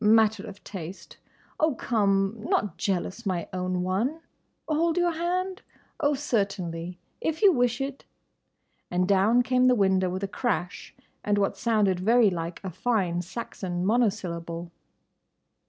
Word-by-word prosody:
—Matter 220 Hz, -1 st, +4 dB
of 200 Hz, 0 st, -11 dB
taste.—Oh, 195 Hz, -, -5 dB
come! 195 Hz, -4 st, +1 dB
Not 210 Hz, -4 st, 0 dB
jealous, 190 Hz, +3 st, -2 dB
my 180 Hz, -4 st, -2 dB
own 180 Hz, 0 st, -1 dB
one?—Hold 310 Hz, -, -2 dB
your 350 Hz, -1 st, +3 dB
hand?—Oh, 350 Hz, -3 st, -2 dB
certainly, 195 Hz, -, -2 dB, 0.2 s
if 320 Hz, +4 st, -2 dB
you 400 Hz, -, +8 dB
wish 245 Hz, -3 st, +1 dB
it!" 270 Hz, 0 st, -4 dB, 0.9 s
And 180 Hz, +1 st, +1 dB
down 205 Hz, +5 st, +4 dB
came 255 Hz, 0 st, +3 dB
the 250 Hz, -, +5 dB
window 190 Hz, -3 st, +2 dB
with 185 Hz, +2 st, -4 dB
a -, -, 0 dB
crash 190 Hz, -4 st, -3 dB, 0.3 s
and 205 Hz, 0 st, +1 dB
what 200 Hz, -1 st, +1 dB
sounded 210 Hz, -5 st, +2 dB
very 225 Hz, +2 st, +4 dB
like 170 Hz, -1 st, -4 dB
a 190 Hz, -, -4 dB
fine 185 Hz, -3 st, 0 dB
Saxon 180 Hz, -2 st, -4 dB
monosyllable. 175 Hz, -7 st, -1 dB
205 Hz, 125 wpm, -27 LUFS, 185-245 Hz, 0.9 s, you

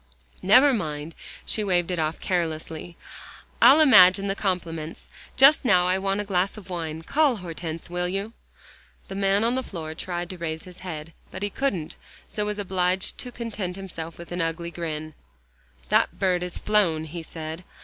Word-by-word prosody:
"Never 255 Hz, +9 st, +6 dB
mind," 155 Hz, -6 st, -3 dB, 0.3 s
she 215 Hz, -, -1 dB
waved 180 Hz, -3 st, +1 dB
it 175 Hz, -, -1 dB
off 155 Hz, +1 st, -1 dB
carelessly, 165 Hz, -1 st, -3 dB, 0.6 s
"I'll 285 Hz, +4 st, +8 dB
imagine 195 Hz, -10 st, +7 dB
the 195 Hz, -, 0 dB
compliments. 165 Hz, -5 st, -3 dB, 0.3 s
Just 275 Hz, +4 st, +7 dB
now 180 Hz, -8 st, +4 dB
I 185 Hz, +1 st, +2 dB
want 195 Hz, +1 st, -1 dB
a -, -, -3 dB
glass 195 Hz, 0 st, 0 dB
of 190 Hz, -3 st, -11 dB
wine. 160 Hz, -2 st, -4 dB
Call 290 Hz, -, +2 dB
Hortense, 165 Hz, -4 st, -6 dB
will 180 Hz, +1 st, -2 dB
you?" 195 Hz, +4 st, -3 dB, 0.8 s
The -, -, -5 dB
man 195 Hz, +1 st, +2 dB
on 235 Hz, +1 st, +2 dB
the 260 Hz, -, 0 dB
floor 160 Hz, -9 st, -6 dB
tried 175 Hz, +1 st, -4 dB
to 185 Hz, -, -9 dB
raise 160 Hz, -1 st, -4 dB
his 180 Hz, -2 st, -13 dB
head. 165 Hz, -3 st, -7 dB, 0.2 s
But 190 Hz, -, -7 dB
he 205 Hz, -, -1 dB
couldn't, 195 Hz, -, -2 dB, 0.3 s
so 210 Hz, -1 st, -3 dB
was 210 Hz, 0 st, -2 dB
obliged 185 Hz, -2 st, -1 dB
to 250 Hz, -, -6 dB
content 215 Hz, -7 st, -4 dB
himself 170 Hz, -4 st, -7 dB
with 170 Hz, 0 st, -11 dB
an 175 Hz, 0 st, -2 dB
ugly 165 Hz, +1 st, -2 dB
grin. 155 Hz, -2 st, -5 dB, 0.8 s
"That -, -, +2 dB
bird 180 Hz, -2 st, +1 dB
has 180 Hz, -1 st, -4 dB
flown," 185 Hz, -7 st, +2 dB
he 165 Hz, +2 st, -6 dB
said. 160 Hz, +1 st, -7 dB
180 Hz, 175 wpm, -25 LUFS, 165-200 Hz, 0.8 s, I'll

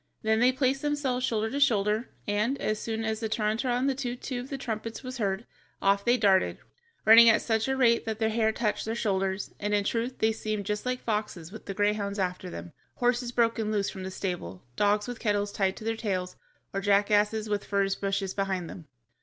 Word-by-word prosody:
Then 220 Hz, 0 st, +2 dB
they 250 Hz, +2 st, +5 dB
placed 260 Hz, +1 st, 0 dB
themselves 290 Hz, -4 st, -1 dB
shoulder 220 Hz, -3 st, 0 dB
to 280 Hz, -, -2 dB
shoulder, 220 Hz, -3 st, +2 dB, 0.2 s
and, 215 Hz, +7 st, 0 dB
as 215 Hz, 0 st, -1 dB
soon 225 Hz, 0 st, -3 dB
as 220 Hz, 0 st, -1 dB
the 225 Hz, -1 st, -2 dB
Tarantará 225 Hz, +3 st, 0 dB
and 260 Hz, +2 st, +1 dB
the 275 Hz, -, +2 dB
Too 250 Hz, -2 st, -3 dB
too 250 Hz, 0 st, -5 dB
of 250 Hz, +2 st, -7 dB
the 275 Hz, -, -4 dB
trumpets 225 Hz, -1 st, -5 dB
was 255 Hz, -1 st, -6 dB
heard, 200 Hz, +1 st, -1 dB, 0.3 s
off 200 Hz, 0 st, +2 dB
they 240 Hz, +3 st, +3 dB
darted, 195 Hz, -4 st, +3 dB, 0.5 s
running 230 Hz, +1 st, +9 dB
at 220 Hz, -, +4 dB
such 220 Hz, 0 st, 0 dB
a 265 Hz, 0 st, 0 dB
rate 235 Hz, -3 st, +4 dB
that 220 Hz, -1 st, -2 dB
their 220 Hz, 0 st, +1 dB
hair 220 Hz, 0 st, +2 dB
touched 215 Hz, -1 st, -1 dB
their 225 Hz, +1 st, -2 dB
shoulders, 195 Hz, -3 st, -1 dB
and 210 Hz, 0 st, 0 dB
in 205 Hz, -, +2 dB
truth 235 Hz, +4 st, -2 dB
they 220 Hz, -, +2 dB
seemed 215 Hz, -2 st, -3 dB
just 210 Hz, +4 st, -2 dB
like 250 Hz, 0 st, -2 dB
foxes 210 Hz, -6 st, -3 dB
with 220 Hz, -, -10 dB
the 195 Hz, -, -4 dB
greyhounds 205 Hz, 0 st, 0 dB
after 180 Hz, -1 st, -2 dB
them, 175 Hz, -2 st, -8 dB, 0.2 s
horses 245 Hz, 0 st, +1 dB
broken 230 Hz, -2 st, +1 dB
loose 205 Hz, -2 st, 0 dB
from 190 Hz, -, -8 dB
the 185 Hz, -, -4 dB
stable, 175 Hz, -, -5 dB
dogs 205 Hz, -, +2 dB
with 245 Hz, -1 st, -6 dB
kettles 205 Hz, -2 st, 0 dB
tied 190 Hz, -2 st, 0 dB
to -, -, -9 dB
their 225 Hz, +1 st, -1 dB
tails, 185 Hz, -5 st, -3 dB, 0.4 s
or 195 Hz, -, -1 dB
jackasses 210 Hz, +2 st, +2 dB
with 205 Hz, -1 st, -1 dB
furze 195 Hz, -1 st, +1 dB
bushes 195 Hz, -1 st, -2 dB
behind 190 Hz, -3 st, -2 dB
them. 165 Hz, -3 st, -10 dB
215 Hz, 215 wpm, -28 LUFS, 200-235 Hz, 0.5 s, running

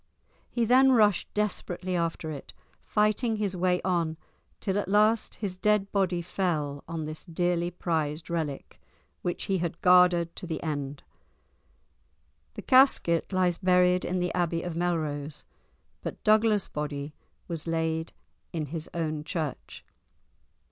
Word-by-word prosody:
He 235 Hz, -2 st, 0 dB
then 260 Hz, +3 st, +6 dB
rushed 210 Hz, -5 st, +3 dB
desperately 185 Hz, -3 st, -2 dB
after 165 Hz, -2 st, -2 dB
it, 140 Hz, -3 st, -8 dB, 0.3 s
fighting 215 Hz, +2 st, +1 dB
his 205 Hz, -3 st, -1 dB
way 180 Hz, 0 st, +2 dB
on 170 Hz, -4 st, 0 dB, 0.4 s
till 200 Hz, -1 st, 0 dB
at 205 Hz, -, -3 dB
last 215 Hz, +3 st, +3 dB
his 195 Hz, -4 st, -4 dB
dead 210 Hz, -1 st, +2 dB
body 185 Hz, -3 st, +1 dB
fell 155 Hz, -6 st, -2 dB
on 165 Hz, -2 st, -4 dB
this 155 Hz, 0 st, -7 dB
dearly 175 Hz, 0 st, 0 dB
prized 160 Hz, -3 st, -2 dB
relic, 160 Hz, -5 st, -4 dB, 0.4 s
which 175 Hz, -, -2 dB
he 195 Hz, -3 st, 0 dB, 0.2 s
guarded 180 Hz, -2 st, +5 dB
to 180 Hz, -, -6 dB
the 160 Hz, -2 st, -4 dB
end. 145 Hz, -3 st, -4 dB, 1.5 s
The -, -, -7 dB
casket 255 Hz, -12 st, +4 dB
lies 180 Hz, -2 st, +1 dB
buried 180 Hz, -1 st, +3 dB
in 185 Hz, -, -1 dB
the 180 Hz, -1 st, -1 dB
Abbey 170 Hz, -2 st, 0 dB
of 175 Hz, -2 st, -4 dB
Melrose, 155 Hz, -4 st, -2 dB, 0.6 s
but -, -, -6 dB
Douglas's 215 Hz, -1 st, +4 dB
body 145 Hz, 0 st, -4 dB, 0.3 s
was 165 Hz, -2 st, -4 dB
laid 160 Hz, 0 st, -1 dB, 0.4 s
in 160 Hz, -3 st, -2 dB
his 160 Hz, -2 st, -4 dB
own 155 Hz, -3 st, -2 dB
church. 160 Hz, -4 st, -5 dB
175 Hz, 135 wpm, -28 LUFS, 160-195 Hz, 1.5 s, then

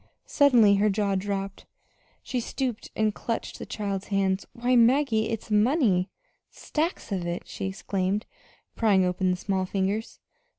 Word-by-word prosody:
Suddenly 240 Hz, -8 st, +5 dB
her 210 Hz, +2 st, +3 dB
jaw 200 Hz, 0 st, 0 dB
dropped. 195 Hz, 0 st, -3 dB, 0.6 s
She 255 Hz, -, -2 dB
stooped 245 Hz, -1 st, -3 dB
and 215 Hz, -1 st, +1 dB
clutched 230 Hz, +2 st, -4 dB
the -, -, -7 dB
child's 200 Hz, -2 st, -4 dB
hands. 195 Hz, -1 st, 0 dB
"Why, 245 Hz, +1 st, +1 dB
Maggie, 235 Hz, -2 st, +3 dB
it's 225 Hz, -1 st, -5 dB
money 210 Hz, -, +3 dB, 0.4 s
stacks 320 Hz, -, -3 dB
of 180 Hz, -3 st, -2 dB
it!" 175 Hz, +1 st, -3 dB
she 195 Hz, -, -4 dB
exclaimed, 190 Hz, +1 st, -2 dB, 0.5 s
prying 200 Hz, -5 st, +3 dB
open 180 Hz, +1 st, 0 dB
the 180 Hz, -, 0 dB
small 190 Hz, 0 st, -1 dB
fingers. 200 Hz, +4 st, -2 dB
205 Hz, 140 wpm, -26 LUFS, 190-230 Hz, 0.6 s, Suddenly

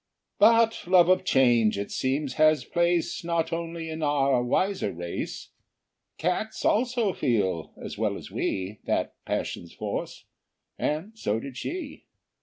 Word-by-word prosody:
But 230 Hz, -4 st, +4 dB
love 180 Hz, -1 st, +6 dB
of 185 Hz, 0 st, +4 dB
change 120 Hz, -, +3 dB
it 100 Hz, 0 st, -4 dB
seems 135 Hz, +1 st, -1 dB
has 155 Hz, -3 st, +4 dB
place 170 Hz, -1 st, 0 dB
Not 165 Hz, -1 st, -1 dB
only 165 Hz, 0 st, -4 dB
in 160 Hz, 0 st, -5 dB
our 140 Hz, -4 st, +2 dB
wiser 185 Hz, -, 0 dB
race; 85 Hz, 0 st, -5 dB, 0.7 s
Cats 180 Hz, +6 st, -2 dB
also 235 Hz, -3 st, +2 dB
feel, 100 Hz, -, 0 dB
as -, -, -7 dB
well -, -, 0 dB
as -, -, -10 dB
we, 95 Hz, +2 st, -2 dB
That -, -, 0 dB
passion's 85 Hz, -, -3 dB
force, -, -, -5 dB, 0.5 s
and 165 Hz, +9 st, -2 dB
so 110 Hz, -, -1 dB
did 135 Hz, +2 st, -8 dB
she. 315 Hz, -, -6 dB
155 Hz, 135 wpm, -27 LUFS, 125-185 Hz, 0.7 s, love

